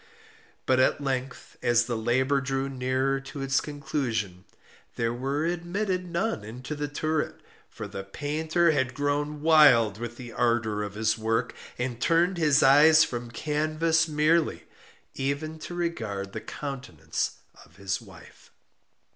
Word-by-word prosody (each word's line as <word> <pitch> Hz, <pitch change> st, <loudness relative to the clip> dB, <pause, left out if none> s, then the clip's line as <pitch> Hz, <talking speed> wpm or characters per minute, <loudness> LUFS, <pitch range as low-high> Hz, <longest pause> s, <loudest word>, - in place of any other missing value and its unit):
But 130 Hz, -1 st, +3 dB
at 130 Hz, -, +3 dB
length, 135 Hz, -2 st, -4 dB
as 120 Hz, -1 st, +3 dB
the 120 Hz, -1 st, -2 dB
labor 130 Hz, +5 st, +1 dB
drew 135 Hz, 0 st, -1 dB
nearer 130 Hz, +1 st, 0 dB
to 135 Hz, +1 st, -7 dB
its 135 Hz, 0 st, +2 dB
conclusion, 120 Hz, -11 st, -3 dB, 0.5 s
there 115 Hz, 0 st, 0 dB
were 135 Hz, +5 st, -2 dB
admitted 180 Hz, +2 st, -2 dB
none 170 Hz, -, -1 dB
into 125 Hz, +7 st, -7 dB
the 145 Hz, 0 st, -3 dB
turret; 155 Hz, +1 st, -2 dB, 0.3 s
for -, -, -7 dB
the 95 Hz, -, -6 dB
painter 155 Hz, -, 0 dB
had 130 Hz, -4 st, 0 dB
grown 145 Hz, +1 st, -1 dB
wild 130 Hz, -10 st, +6 dB
with 120 Hz, 0 st, -6 dB
the 120 Hz, -2 st, -8 dB
ardor 115 Hz, -3 st, +1 dB
of 105 Hz, -1 st, -5 dB
his 110 Hz, +1 st, 0 dB
work, 115 Hz, +2 st, 0 dB, 0.2 s
and 125 Hz, -1 st, -3 dB
turned 170 Hz, +4 st, +2 dB
his 150 Hz, -3 st, +4 dB
eyes 155 Hz, +4 st, +7 dB
from 120 Hz, -5 st, -4 dB
canvas 155 Hz, +5 st, +1 dB
merely, 155 Hz, +2 st, +2 dB, 0.5 s
even 145 Hz, +4 st, -3 dB
to 175 Hz, -, -7 dB
regard 110 Hz, -, -3 dB
the -, -, -5 dB
countenance 125 Hz, -, -4 dB, 0.3 s
of 80 Hz, -, -22 dB
his 95 Hz, 0 st, -3 dB
wife. -, -, -16 dB
135 Hz, 140 wpm, -27 LUFS, 120-155 Hz, 0.5 s, eyes